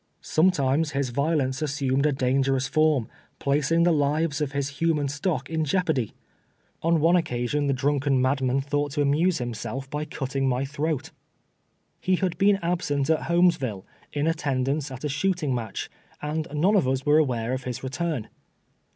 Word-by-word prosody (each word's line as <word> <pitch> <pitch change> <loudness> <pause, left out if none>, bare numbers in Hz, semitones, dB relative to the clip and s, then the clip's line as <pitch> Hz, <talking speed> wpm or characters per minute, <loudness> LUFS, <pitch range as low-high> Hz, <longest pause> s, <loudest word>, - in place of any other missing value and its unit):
Sometimes 155 -3 +2
his 140 -2 -1
violence 140 -1 0
assumed 140 -1 +1
a - - +2
dangerous 135 0 +1
form, 155 -6 +2 0.3
placing 150 +4 +2
the 175 - +4
lives 150 +1 +1
of 145 -2 -1
his 140 0 -1
human 160 -4 +1
stock 145 0 -2
in 160 -1 -1
jeop 175 +4 0
ardy. 130 -8 0 0.7
On 165 0 +2
one 165 +3 +4
occasion 145 -2 0
the 140 - +2
drunken 140 0 +1
madman 130 0 +1
thought 145 +1 -1
to 145 -1 +1
amuse 160 +5 +2
himself 125 +2 -4
by 150 +1 -2
cutting 135 -2 -2
my 130 +2 0
throat. 150 +1 -2 0.9
He 185 - +1
had 180 -2 -1
been 200 0 +5
absent 160 -5 0
at 160 - 0
Ilolmesville, 165 - +2 0.3
in 145 0 -1
attendance 145 -2 0
at 130 0 -9
a - - 0
shooting 150 0 0
match, 115 -5 -4 0.3
and 155 +2 -3
none 175 +8 +2
of 185 -10 +3
us 130 0 -1
were 150 +1 +5
aware 125 -5 0
of 130 -1 -4
his 125 0 -5
return. 145 -2 -2
145 Hz, 165 wpm, -25 LUFS, 135-160 Hz, 0.9 s, been